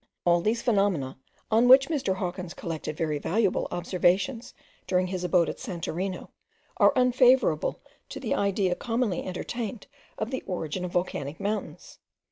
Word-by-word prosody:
All 175 0 +4
these 220 +5 0
phenomena, 195 - +1 0.3
on 230 +3 +4
which 265 +2 +8
Mr. 275 - -1
Hawkins 180 -1 -4
collected 155 -2 -5
very 155 -2 -1
valuable 195 +5 0
observations 185 +7 0 0.3
during 185 0 +2
his 185 0 -4
abode 180 -1 +3
at - - -5
Santorino, 185 -3 -4 0.5
are - - +6
unfavourable 250 - +3 0.3
to - - -6
the - - -2
idea 200 -2 +1
commonly 230 -2 -1
entertained 215 +4 -5 0.3
of 220 +3 -3
the 260 - -2
origin 180 -1 -3
of 180 - -4
volcanic 155 -4 -2
mountains. 210 +1 -4
190 Hz, 140 wpm, -27 LUFS, 175-230 Hz, 0.5 s, which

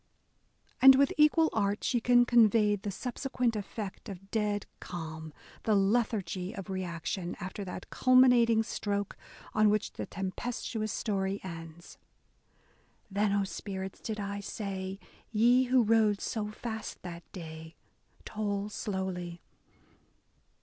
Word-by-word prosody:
And 265 0 +10
with 275 +1 +3
equal 310 +1 +4
art 205 -1 0
she 240 - +1
can 245 +1 +5
convey 220 -3 +5
the 205 +1 -5
subse 250 +6 -5
quent 245 -3 +1
effect 210 +1 -6
of 195 0 -10
dead 210 -2 0
calm, 160 -2 -7 0.2
— - - -22
the 215 - +3
lethargy 195 -2 0
of 195 -1 -6
reaction 180 -1 -3
after 190 +2 -5
that 180 0 -8
culminating 245 -3 +5
stroke 205 -2 -3 0.4
on 215 0 +4
which 210 0 0
the - - -5
tempestuous 215 +2 -3
story 195 -2 -1
ends: 165 -1 -9 1.1
Then, 205 +1 +1
O 200 0 +2
spirits, 190 -1 -6
did 215 -1 -4
I 200 0 -3
say, 195 -2 -5 0.3
ye 240 +4 +4
who 255 0 +4
rode 215 -2 +3
so 210 -2 -3
fast 220 0 -6
that 170 -1 -9
day, 160 -2 -9 0.3
— - - -32
Toll 205 -1 -2
slowly. 190 -5 -4
205 Hz, 130 wpm, -30 LUFS, 190-225 Hz, 1.1 s, And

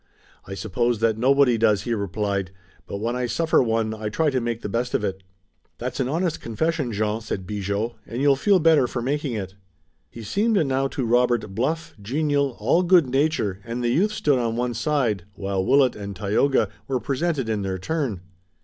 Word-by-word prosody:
"I 95 - -6
suppose 120 +4 0
that 110 -1 +2
nobody 130 -1 +4
does!" 105 -3 +3
he 120 - -1
replied, 100 -2 -2 0.4
"but - - -4
when 115 +4 -2
I 125 0 -1
suffer 160 +8 +2
one 115 -2 0
I 110 -1 -4
try 150 +7 +1
to 130 -2 0
make 115 -1 -3
the - - -2
best 120 +4 -1
of - - 0
it." 95 -1 -3 0.6
"That's 125 +3 -4
an 130 - +1
honest 165 +2 -1
confession, 145 +3 -1
Jean," 105 +1 -1
said 100 -4 -4
Bigot, 100 +3 -2 0.2
"and 115 +3 -5
you'll 140 0 +4
feel 195 +8 +3
better 160 -6 +4
for 120 -1 -4
making 140 0 -1
it." 95 -4 -4 0.6
He 115 +6 -10
seemed 210 - +1
now 135 0 +1
to 135 -2 -3
Robert 120 -3 +2
bluff, 155 +10 -2
genial, 140 +3 0
all 130 +11 +3
good 180 -3 +5
nature, 135 -9 +1
and 120 +2 -4
the 120 - +1
youth 190 - +2
stood 145 -10 +1
on 115 -2 -1
one 120 0 -1
side, 115 - 0
while 95 -1 -2
Willet 135 +4 +4
and 100 -1 -6
Tayoga 105 +9 +1 0.2
were 130 -2 0
presented 140 -1 -1
in 110 -2 -1
their 95 -1 -2
turn. 120 - -2
120 Hz, 195 wpm, -24 LUFS, 105-140 Hz, 0.6 s, good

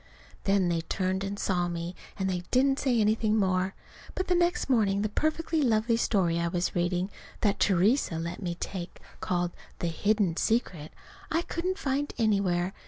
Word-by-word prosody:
Then 195 -2 +3
they 170 -1 +1
turned 185 +3 -1
and 200 +1 -3
saw 180 -3 0
me, 170 0 -4 0.2
and 190 -2 -1
they 180 -2 -1
didn't 270 +2 +3
say 250 -4 +2
anything 215 0 +2
more. 190 -1 +1 0.4
But 375 - -2
the - - +4
next 350 0 +2
morning 205 -6 +2
the 215 - 0
perfectly 315 +6 0
lovely 230 -2 +2
story 185 -7 +1
I 170 - 0
was 175 +1 -1
reading, 180 +2 0 0.3
that 200 -2 +1
Theresa 195 - +3
let 170 +3 -4
me 175 -3 -2
take, 180 0 -6 0.2
called 175 -1 -1 0.3
"The 170 - -1
Hidden 200 0 +1
Secret," 180 -9 0 0.4
I 330 +2 +1
couldn't 365 +3 -2
find 285 -4 -2
anywhere. 195 -5 +1
195 Hz, 170 wpm, -28 LUFS, 175-235 Hz, 0.4 s, the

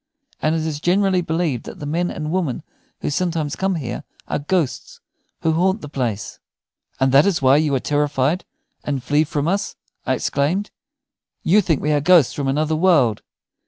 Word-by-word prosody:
And 155 +1 +1
it 160 -1 -1
is 155 -2 -3
generally 185 +2 +2
believed 160 -7 -1
that - - -9
the 150 - -7
men 170 +4 -1
and 155 0 -4
women 170 -9 -1 0.4
who - - -2
sometimes 160 -2 -1
come 190 -1 0
here 125 -7 -4 0.2
are - - -1
ghosts 155 0 -2 0.4
who 160 - +2
haunt 190 +6 +1
the - - -7
place." 115 -8 -3 0.6
"And 135 0 +3
that 140 +7 +6
is 190 -4 +1
why 135 +1 +5
you 150 -2 +1
are - - +1
terrified 145 +3 0 0.4
and 140 -3 -3
flee 145 +4 +2
from 145 0 -2
us?" 195 +3 -1 0.3
I - - +1
exclaimed. 165 +9 -1 0.7
"You 200 +6 +4
think 160 -6 0
we 150 - +1
are 145 -1 +2
ghosts 170 -4 +5
from 140 -2 -3
another 155 +3 +1
world?" 155 - +3
155 Hz, 180 wpm, -21 LUFS, 140-175 Hz, 0.7 s, that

